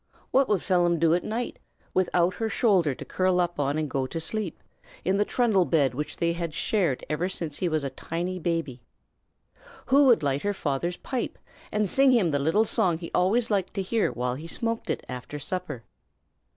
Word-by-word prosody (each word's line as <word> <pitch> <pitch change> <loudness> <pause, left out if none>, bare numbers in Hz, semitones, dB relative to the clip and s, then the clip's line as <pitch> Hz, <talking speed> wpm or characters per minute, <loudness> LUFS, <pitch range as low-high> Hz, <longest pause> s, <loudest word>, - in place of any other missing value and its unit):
What 270 0 +3
would 205 -4 +1
Phelim 175 -2 +2
do 165 0 +3
at 175 - +1
night, 235 +3 -3 0.3
without 180 -1 +2
her 225 -1 -1
shoulder 190 - +2
to - - -9
curl 185 -1 +1
up 175 -3 -1
on 145 +1 0
and 155 -1 -1
go 135 -1 -1
to 165 - -4
sleep, 195 +2 -3 0.4
in 190 +3 +2
the 205 - +3
trundle 220 -7 +2
bed 150 -6 +2
which 150 +4 -4
they 170 0 +1
had 170 -2 -4
shared 175 - 0
ever 165 +5 -1
since 165 -5 -4
he 180 - 0
was 155 -2 0
a 135 - -3
tiny 175 +6 -4
baby? 165 -7 -2 1.0
Who 280 +2 +5
would 240 - +5
light 140 0 0
her 205 0 -1
father's 170 +3 -2
pipe, 255 - -4 0.3
and 210 -1 +1
sing 270 +8 +4
him 200 -9 +3
the 145 - +1
little 165 +10 +2
song 175 -5 +1
he 170 0 -8
always 215 +6 +2
liked 195 -2 0
to 195 - -1
hear 220 +3 +1
while 125 0 -2
he 150 +6 -7
smoked 230 +4 -2
it - - -2
after 125 +3 -6
supper? 145 -4 -4
175 Hz, 200 wpm, -26 LUFS, 155-205 Hz, 1.0 s, Who